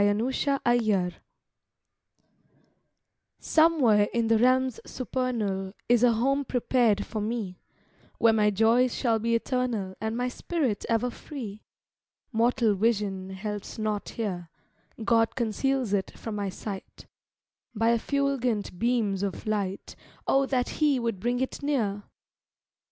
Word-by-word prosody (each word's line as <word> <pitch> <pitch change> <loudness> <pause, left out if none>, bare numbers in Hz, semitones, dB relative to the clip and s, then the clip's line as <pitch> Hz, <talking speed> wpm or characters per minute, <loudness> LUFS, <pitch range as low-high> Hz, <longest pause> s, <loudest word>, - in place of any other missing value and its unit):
_" - - +5
EYE - - +5
HATH 240 +2 +1
NOT 180 -2 0
SEEN - - -36 1.1
Somewhere 275 -11 +4
in 230 -2 0
the 225 -1 +4
realms 255 0 +3
supernal 220 -7 -2
Is 240 -1 +4
a 240 -1 +6
home 275 +5 +1
prepared 245 -4 +1
for 215 - -4
me, 210 -4 -3 0.6
Where 230 -1 +5
my 210 -1 +3
joys 225 +4 +3
shall 230 -4 +1
be 230 +1 +1
eternal, 230 -6 -1
And 220 +1 -2
my 250 0 0
spirit 255 - -2
ever 235 +2 +1
free; 230 -8 -8 0.7
Mortal 230 -1 +2
vision 200 -3 0
helps 205 +1 -5
not 215 -2 -2
here, 180 -7 -4 0.6
God 230 -1 +3
conceals 250 0 0
it 195 -2 -1
from 225 -2 -5
my 200 -1 -2
sight, 195 +1 -8 0.7
By 225 +2 +3
effulgent 245 -6 0
beams 225 -5 +1
of 200 -2 -3
light; 200 -3 -2 0.3
Oh 270 0 +3
that 250 -2 0
He 290 -4 +4
would 230 -5 -2
bring 245 +4 0
it 260 - -3
near! 220 -9 -1
230 Hz, 130 wpm, -27 LUFS, 205-250 Hz, 1.1 s, a